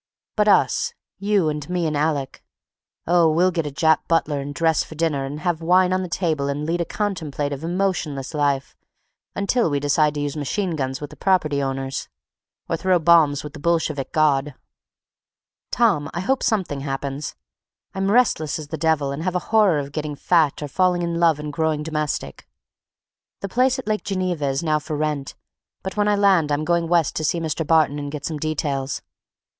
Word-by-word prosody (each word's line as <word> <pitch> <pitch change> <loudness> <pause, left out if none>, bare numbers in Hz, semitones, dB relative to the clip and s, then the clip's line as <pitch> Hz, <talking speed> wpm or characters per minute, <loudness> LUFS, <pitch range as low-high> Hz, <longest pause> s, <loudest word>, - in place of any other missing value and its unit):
But - - +2
us—you 210 - +1
and 150 +1 -5
me 180 -1 0
and 155 -1 -1
Alec—oh, 155 +3 -1
we'll 180 +4 +3
get 165 -3 -2
a - - -5
Jap 160 +2 +3
butler 155 -3 +1
and 140 +1 -5
dress 160 +1 +1
for 155 - -11
dinner 155 -4 0
and 145 +3 -6
have 175 -3 -1
wine 180 +2 +4
on 185 - +1
the 185 - -5
table 160 -6 -1
and 145 +2 -2
lead 170 +2 -1
a - - 0
contemplative, 150 -9 -3
emotionless 170 -6 -2
life 140 -2 0 0.6
until 200 0 +1
we 145 -1 0
decide 145 +1 +2
to - - -2
use 145 0 -3
machine 170 +5 -2
guns 135 -2 -3
with 145 - -6
the - - -11
property 155 -7 +1
owners—or 135 +4 -6
throw 185 +1 +2
bombs 160 -4 +4
with 150 - -8
the - - -9
Bolshevik 155 -3 0
God! 150 -3 +2 1.1
Tom, 185 -12 +2
I 175 - -1
hope 265 +8 0
something 190 - 0
happens. 135 +1 -4 0.6
I'm 195 0 -1
restless 205 -9 +2
as 155 -2 -8
the 160 - -5
devil 155 -3 +1
and 140 +3 -4
have 185 +1 -2
a 180 - -3
horror 210 -7 +5
of 140 -1 -4
getting 150 0 -4
fat 155 -1 +2
or - - -3
falling 180 +3 +1
in 170 0 -2
love 165 -3 +4
and 150 0 -5
growing 155 -1 0
domestic. 150 - -3 0.9
The 195 - -4
place 255 +5 +2
at 260 - -6
Lake 215 0 -1
Geneva 185 -6 -1
is 135 +3 -1
now 155 -2 +2
for 150 0 -5
rent 150 -2 -2 0.5
but 190 - -5
when 205 0 +1
I 210 - +3
land 190 -7 +3
I'm 145 +1 0
going 170 0 +1
West 170 -3 +2
to 155 - -2
see 160 +3 +1
Mr. 160 -1 -2
Barton 155 -3 +3
and 145 0 -5
get 145 -1 -6
some 155 -2 -3
details. 145 -3 -2
155 Hz, 185 wpm, -22 LUFS, 145-175 Hz, 1.1 s, horror